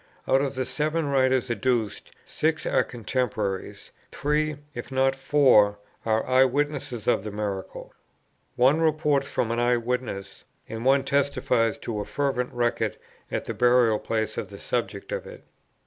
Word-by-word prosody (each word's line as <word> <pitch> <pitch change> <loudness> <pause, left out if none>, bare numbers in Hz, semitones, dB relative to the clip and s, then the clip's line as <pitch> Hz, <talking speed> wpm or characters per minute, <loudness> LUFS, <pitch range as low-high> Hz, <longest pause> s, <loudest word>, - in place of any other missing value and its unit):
"Out 135 - +4
of 140 -1 -2
the 130 0 -1
seven 150 +5 -1
writers 130 -2 +2
adduced, 115 -1 -1 0.2
six 155 0 -1
are - - +2
contemporaries; 110 -5 -3 0.2
three, 150 +1 0 0.2
if 120 +2 -7
not 135 0 +2
four, 135 -7 +4 0.3
are 110 0 +2
eye 130 +1 +5
witnesses 135 -4 -1
of - - +2
the 105 - -4
miracle. 100 -2 -5 0.6
One 135 +5 +4
reports 150 -3 +2
from 115 -4 -1
an 115 - 0
eye 120 0 +3
witness, 115 -5 -4 0.2
and 115 +1 -6
one 135 +1 +4
testifies 135 -5 +1
to 110 -3 -4
a 105 - -3
fervent 135 -3 -1
record 120 -1 -1 0.3
at - - -2
the - - -3
burial 120 -3 +4
place 110 -1 -2
of 100 - -5
the 100 - -10
subjects 105 -3 -3
of - - -4
it. - - -11
125 Hz, 155 wpm, -26 LUFS, 110-140 Hz, 0.6 s, eye